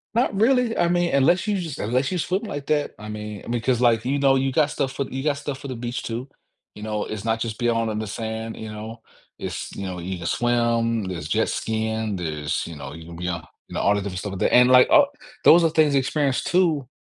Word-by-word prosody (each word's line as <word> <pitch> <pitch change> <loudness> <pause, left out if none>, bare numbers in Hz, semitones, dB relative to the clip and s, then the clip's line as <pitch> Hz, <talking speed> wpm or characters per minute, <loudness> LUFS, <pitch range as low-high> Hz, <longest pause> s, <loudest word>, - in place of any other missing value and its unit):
Not 235 -2 +2
really, 235 +3 +2
I 175 - +3
mean, 175 -1 +1
unless 160 +9 +3
you 205 -2 0
just 165 -6 -5
unless 125 +6 0
you 185 - -2
swim 185 +5 -1
like 145 -10 -5
that, 150 -1 +1
I 105 0 -9
mean, 105 +1 -6
because 120 +1 0
like, 115 -2 +3
you 140 +3 +1
know, 135 -1 +4
you 135 0 +1
got 150 0 +3
stuff 135 -2 -2
for 140 - -1
you 135 0 -5
got 150 - +3
stuff 140 -1 -5
for 140 - -8
the 130 - -5
beach 120 0 -4
too, 120 +4 -5 0.4
you 105 - -10
know, 105 -1 -2
it's 110 0 -6
not 115 0 0
just 110 -2 -3
being 120 -1 +2
all 115 -1 0
in 105 - -2
the 110 - -4
sand, 110 +1 -4
you 110 -1 -7
know, 110 +2 -8 0.4
it's - - -5
you 100 - -5
know, 90 -1 -5
you 90 +2 -4
can 85 - -8
swim, 115 0 +1
there's 85 -5 -5
jet - - +1
skiing, 110 -1 -2
there's 75 -4 -2
you 85 -3 -8
know, 70 0 -8
you 80 +1 -10
can 85 -1 -9
be 90 +1 -4
on 85 -1 -3 0.2
you - - -12
know, - - -1
all 100 - +4
the 100 - 0
different 95 -2 -4
stuff 100 0 -5
like 95 - -6
that, - - +1
and 125 0 +7
like, 125 0 +7
uh, 315 -2 +7 0.4
those 170 +1 +7
are - - +4
things 155 -2 +3
to 140 - +4
experience 135 0 0
too. 165 -8 +2
120 Hz, 260 wpm, -23 LUFS, 105-145 Hz, 0.4 s, and